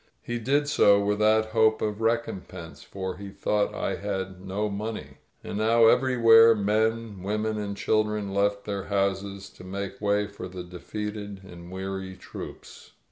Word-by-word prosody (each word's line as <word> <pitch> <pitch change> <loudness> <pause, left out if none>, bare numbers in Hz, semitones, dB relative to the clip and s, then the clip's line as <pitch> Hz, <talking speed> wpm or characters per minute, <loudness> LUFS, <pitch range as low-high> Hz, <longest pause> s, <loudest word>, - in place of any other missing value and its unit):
He 120 0 -3
did 140 +5 +1
so 100 -8 +5
without 105 +2 +2
hope 110 -1 +4
of 105 0 -2
recompense, 105 -7 -3
for 95 -2 -6
he 100 0 -8
thought 105 +1 -1
I - - -2
had 95 -2 -4
no 100 +3 -2
money. 105 +2 -5 0.3
And 105 - -4
now 115 +1 +5
everywhere 115 -2 +6
men, 110 0 0
women 105 +2 -1
and 100 -1 -4
children 105 -2 0
left 100 0 +1
their 100 -2 -3
houses 100 0 -1
to - - -14
make 100 +1 -6
way 105 0 +2
for 100 -2 -8
the 90 -1 -7
de 90 0 -10
feated 105 -1 -5
and 85 -1 -11
weary 95 0 -5
troops. - - -10
105 Hz, 155 wpm, -26 LUFS, 95-110 Hz, 0.3 s, everywhere